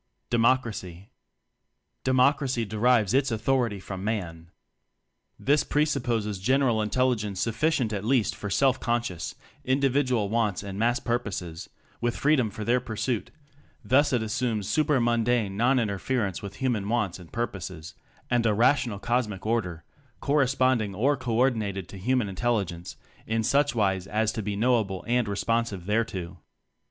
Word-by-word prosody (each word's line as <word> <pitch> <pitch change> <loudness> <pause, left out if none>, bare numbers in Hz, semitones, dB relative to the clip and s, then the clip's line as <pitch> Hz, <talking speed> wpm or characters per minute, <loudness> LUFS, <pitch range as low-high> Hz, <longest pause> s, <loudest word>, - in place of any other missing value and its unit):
Democracy. 115 -7 0 0.9
Democracy 130 -1 +2
derives 110 0 +2
its 135 +1 +3
authority 115 -2 0
from 95 0 -7
Man. 85 -6 -4 0.9
This 145 +2 +2
pre 150 +1 +2
supposes 115 -8 -1
general 125 +1 +2
intelligence 105 -3 0
sufficient 120 +1 0
at 100 -1 -3
least 120 -1 +1
for 105 - -5
self 130 +4 +2
conscious 120 -8 -2 0.3
Individual 130 -4 +1
wants 110 -3 0
and 100 0 -6
Mass 120 +2 +2
purposes, 95 -8 -3 0.3
with 120 0 -1
freedom 140 -6 +2
for 105 +1 -7
their 120 +3 +2
pur 120 -3 -7
suit; 120 0 -2 0.6
thus 140 +7 +4
it 120 -4 +1
assumes 110 -2 -1
super 150 +5 +2
mundane 120 -3 +1
non 125 +5 +3
interference 105 -2 -1
with 100 - -7
human 115 -6 -1
wants 105 -6 0
and 85 -2 -14
purposes, 95 -8 -5 0.4
and 120 -1 +3
a 105 - +2
rational 120 -1 +2
Cosmic 110 -3 -1
Order 90 -8 -1 0.4
corresponding 130 -7 +1
or 135 +8 +2
co 125 -4 -3
ordinated 105 -7 0
to 100 - -9
human 125 +2 +1
intelligence 95 -4 -2 0.3
in 110 0 0
suchwise 110 -8 +1
as 105 +1 0
to 110 - -4
be 105 0 -3
knowable 110 -4 +1
and 120 -1 +1
responsive 105 -2 -1
there 110 +3 +1
to. 90 -4 -7
115 Hz, 140 wpm, -26 LUFS, 100-125 Hz, 0.9 s, thus